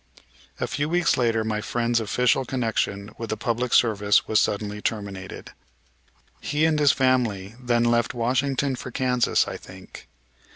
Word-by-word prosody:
A -, -, 0 dB
few 145 Hz, +1 st, -2 dB
weeks 175 Hz, +1 st, +2 dB
later 115 Hz, -3 st, +1 dB
my 110 Hz, -1 st, -2 dB
friend's 120 Hz, +1 st, 0 dB
official 125 Hz, +4 st, +1 dB
connection 110 Hz, -5 st, -2 dB
with 115 Hz, -, -5 dB
the 110 Hz, -, -2 dB
public 120 Hz, +2 st, -2 dB
service 105 Hz, -3 st, +3 dB
was 110 Hz, -, +3 dB
suddenly 105 Hz, 0 st, -1 dB
terminated. 100 Hz, -4 st, -5 dB, 0.9 s
He 150 Hz, +2 st, 0 dB
and 160 Hz, -1 st, +2 dB
his 145 Hz, -2 st, +5 dB
family 115 Hz, -6 st, 0 dB
then 120 Hz, -1 st, +1 dB
left 120 Hz, 0 st, +1 dB
Washington 130 Hz, +3 st, 0 dB
for 130 Hz, -, -7 dB
Kansas, 125 Hz, -1 st, +1 dB
I -, -, -5 dB
think. 95 Hz, 0 st, -13 dB
120 Hz, 150 wpm, -24 LUFS, 105-130 Hz, 0.9 s, his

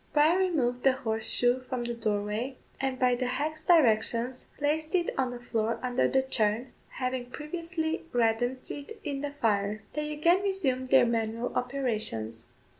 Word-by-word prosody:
Bryan 310 Hz, +5 st, +5 dB
removed 265 Hz, -10 st, +1 dB
the 265 Hz, 0 st, +5 dB
horseshoe 245 Hz, 0 st, +1 dB
from 255 Hz, -1 st, -4 dB
the 240 Hz, 0 st, -2 dB
doorway, 215 Hz, +3 st, -2 dB, 0.2 s
and 265 Hz, -1 st, -1 dB
by 250 Hz, -1 st, +3 dB
the 250 Hz, +1 st, -1 dB
hag's 305 Hz, +5 st, -2 dB
directions 250 Hz, -5 st, +3 dB
placed 310 Hz, +3 st, 0 dB
it 345 Hz, -2 st, +1 dB
on 260 Hz, -2 st, +1 dB
the 245 Hz, 0 st, -6 dB
floor 230 Hz, -1 st, -1 dB
under 250 Hz, 0 st, +2 dB
the 265 Hz, 0 st, +2 dB
churn, 235 Hz, -1 st, 0 dB, 0.2 s
having 255 Hz, -1 st, -3 dB
previously 325 Hz, +3 st, -3 dB
reddened 245 Hz, +2 st, +1 dB
it 355 Hz, +11 st, -8 dB
in 280 Hz, -3 st, -3 dB
the 290 Hz, -, -2 dB
fire. 215 Hz, -6 st, 0 dB
They 300 Hz, 0 st, -2 dB
again 335 Hz, +5 st, +3 dB
resumed 275 Hz, -11 st, -1 dB
their 265 Hz, -2 st, +6 dB
manual 230 Hz, 0 st, -1 dB
operations. 215 Hz, -, -2 dB
255 Hz, 155 wpm, -29 LUFS, 230-295 Hz, 0.2 s, their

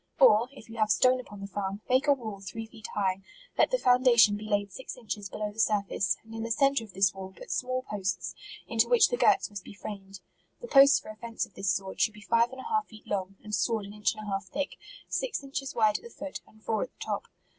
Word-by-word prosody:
Or, 235 Hz, -2 st, +6 dB
if 275 Hz, -5 st, -14 dB
you 230 Hz, 0 st, -10 dB
have 215 Hz, -1 st, +2 dB
stone 255 Hz, +3 st, +4 dB
upon 205 Hz, -5 st, -10 dB
the 200 Hz, -, -5 dB
farm, 200 Hz, +1 st, -4 dB
make 260 Hz, +3 st, +3 dB
a 285 Hz, -, +7 dB
wall 220 Hz, -7 st, -6 dB
three 225 Hz, +3 st, -6 dB
feet 220 Hz, 0 st, -10 dB
high; 195 Hz, -2 st, 0 dB, 0.3 s
let -, -, +4 dB
the -, -, +2 dB
foundation 245 Hz, -, +5 dB
be 215 Hz, +1 st, -7 dB
laid 205 Hz, -1 st, 0 dB
six 260 Hz, +6 st, -8 dB
inches 210 Hz, -4 st, -5 dB
below 210 Hz, +1 st, -3 dB
the 215 Hz, -, -12 dB
sur 210 Hz, -2 st, +3 dB
face; 190 Hz, -1 st, 0 dB
and 225 Hz, 0 st, -13 dB
in 225 Hz, -, -4 dB
the 230 Hz, -, -3 dB
centre 275 Hz, +1 st, +3 dB
of 210 Hz, -4 st, -13 dB
this 195 Hz, 0 st, +3 dB
wall 190 Hz, 0 st, -8 dB
put -, -, -9 dB
small 255 Hz, 0 st, -1 dB
posts, 190 Hz, -5 st, -3 dB, 0.3 s
into -, -, +2 dB
which 485 Hz, -3 st, +6 dB
the 485 Hz, -, 0 dB
girts -, -, +3 dB
must 200 Hz, -2 st, -7 dB
be 205 Hz, -, -11 dB
framed. 195 Hz, -2 st, -8 dB, 0.4 s
The 485 Hz, -, -8 dB
posts 275 Hz, -5 st, +7 dB
for -, -, -12 dB
a -, -, -12 dB
fence 230 Hz, +1 st, -3 dB
of -, -, -23 dB
this 195 Hz, 0 st, 0 dB
sort, 195 Hz, 0 st, -3 dB
should 215 Hz, -, +2 dB
be 210 Hz, -, -12 dB
five 230 Hz, +1 st, +4 dB
and 260 Hz, 0 st, -8 dB
a -, -, -10 dB
half 435 Hz, -2 st, 0 dB
feet 220 Hz, -2 st, -15 dB
long, 195 Hz, -1 st, -3 dB
and 210 Hz, -, -8 dB
sawed 220 Hz, -2 st, +1 dB
an 200 Hz, -, -9 dB
inch 210 Hz, +1 st, 0 dB
and 215 Hz, -, -8 dB
a -, -, -3 dB
half 195 Hz, 0 st, -2 dB
thick, 285 Hz, +8 st, -2 dB, 0.4 s
six -, -, -2 dB
inches 270 Hz, -1 st, -4 dB
wide 215 Hz, -3 st, +3 dB
at -, -, -23 dB
the 470 Hz, -, -9 dB
foot, 290 Hz, -9 st, -7 dB
and 215 Hz, 0 st, -22 dB
four 220 Hz, -2 st, 0 dB
at -, -, -2 dB
the -, -, -43 dB
top. -, -, -3 dB
215 Hz, 265 wpm, -29 LUFS, 200-255 Hz, 0.4 s, a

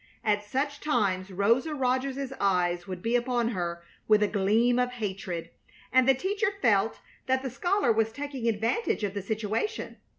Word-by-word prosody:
At 210 Hz, -1 st, +1 dB
such 280 Hz, +7 st, -2 dB
times 200 Hz, -10 st, 0 dB
Rosa 230 Hz, -, +1 dB
Rogers's 265 Hz, +1 st, -1 dB
eyes 180 Hz, -2 st, +1 dB
would 185 Hz, -2 st, -6 dB
be 230 Hz, +1 st, +1 dB
upon 240 Hz, -1 st, +1 dB
her 170 Hz, -5 st, -3 dB, 0.2 s
with 215 Hz, -1 st, +5 dB
a -, -, +3 dB
gleam 220 Hz, +5 st, +2 dB
of 250 Hz, 0 st, 0 dB
hatred, 190 Hz, -7 st, -4 dB, 0.4 s
and 260 Hz, 0 st, +5 dB
the 270 Hz, -, +6 dB
teacher 400 Hz, -, 0 dB
felt 220 Hz, -3 st, +2 dB, 0.3 s
that 260 Hz, 0 st, +1 dB
the 265 Hz, -, -3 dB
scholar 350 Hz, -, +1 dB
was 225 Hz, 0 st, +1 dB
taking 275 Hz, -2 st, -4 dB
advantage 225 Hz, -, 0 dB
of 200 Hz, -2 st, -1 dB
the 200 Hz, -, -3 dB
situation. 215 Hz, -, -3 dB
230 Hz, 165 wpm, -28 LUFS, 200-260 Hz, 0.4 s, the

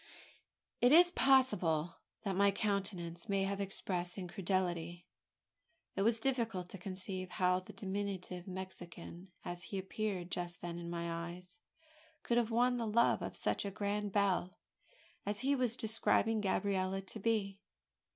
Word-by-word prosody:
It 245 Hz, -, +6 dB
is 350 Hz, +3 st, +8 dB
possible 195 Hz, -, +3 dB, 0.3 s
that 195 Hz, -3 st, -1 dB
my 200 Hz, +1 st, +5 dB
countenance 195 Hz, -4 st, -2 dB
may 195 Hz, -1 st, +2 dB
have 200 Hz, +1 st, -1 dB
expressed 180 Hz, -2 st, -1 dB
incredulity. 175 Hz, -2 st, -2 dB, 0.9 s
It -, -, 0 dB
was 225 Hz, +2 st, +3 dB
difficult 225 Hz, -8 st, -1 dB
to 195 Hz, -, -9 dB
conceive 185 Hz, 0 st, -4 dB
how 180 Hz, 0 st, +2 dB
the 185 Hz, -, -11 dB
diminutive 190 Hz, -2 st, -4 dB
Mexican 185 Hz, -1 st, -8 dB, 0.2 s
as 175 Hz, +1 st, -5 dB
he 200 Hz, -, -4 dB
appeared 190 Hz, -2 st, -3 dB
just 175 Hz, -1 st, -3 dB
then 170 Hz, 0 st, -4 dB
in 170 Hz, 0 st, -6 dB
my 170 Hz, 0 st, -3 dB
eyes 180 Hz, +9 st, -10 dB, 0.6 s
could 235 Hz, -, +1 dB
have 230 Hz, -2 st, 0 dB
won 245 Hz, +2 st, +3 dB
the 230 Hz, -2 st, -1 dB
love 235 Hz, +2 st, +3 dB
of -, -, -4 dB
such -, -, 0 dB
a 200 Hz, -, -2 dB
grand 205 Hz, +1 st, -2 dB
belle 190 Hz, -2 st, +1 dB, 0.7 s
as 205 Hz, +2 st, -3 dB
he 275 Hz, +2 st, +3 dB
was 250 Hz, -2 st, +1 dB
describing 225 Hz, 0 st, +2 dB
Gabriella 195 Hz, -1 st, 0 dB
to 195 Hz, +3 st, -8 dB
be. 200 Hz, -2 st, 0 dB
195 Hz, 145 wpm, -35 LUFS, 180-215 Hz, 0.9 s, is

